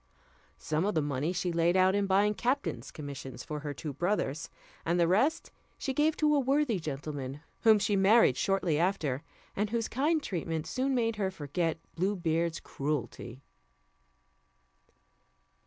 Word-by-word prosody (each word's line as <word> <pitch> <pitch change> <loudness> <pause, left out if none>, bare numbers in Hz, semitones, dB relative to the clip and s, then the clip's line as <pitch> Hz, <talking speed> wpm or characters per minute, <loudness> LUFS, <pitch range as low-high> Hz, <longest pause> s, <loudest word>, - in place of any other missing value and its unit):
Some 155 +2 -1
of 205 -1 0
the 155 - +3
money 145 +3 -1
she 180 0 -1
laid 170 +2 +2
out 185 0 +5
in 200 0 +1
buying 200 +2 +3
captains' 255 +6 -1
commissions 135 -4 -7
for 150 -2 -5
her 145 0 -4
two 145 +2 -6
brothers, 165 -1 -1 0.3
and 170 +2 +1
the 170 - +4
rest 255 - +2 0.3
she 270 - -2
gave 300 +3 +2
to 300 -1 +3
a 290 - +4
worthy 270 -5 +1
gentleman 145 -2 -5 0.2
whom 220 -1 +6
she 205 0 +1
married 195 - +5
shortly 190 -5 +1
after, 165 -7 0 0.3
and 210 +1 0
whose 230 0 -1
kind 300 +5 +1
treatment 165 -3 -3
soon 265 +1 -1
made 230 -2 0
her 195 -2 0
forget 165 -1 -2 0.2
Blue 190 +4 0
Beard's 170 -1 0
cruelty. 140 -2 -4
180 Hz, 155 wpm, -30 LUFS, 155-215 Hz, 0.3 s, whom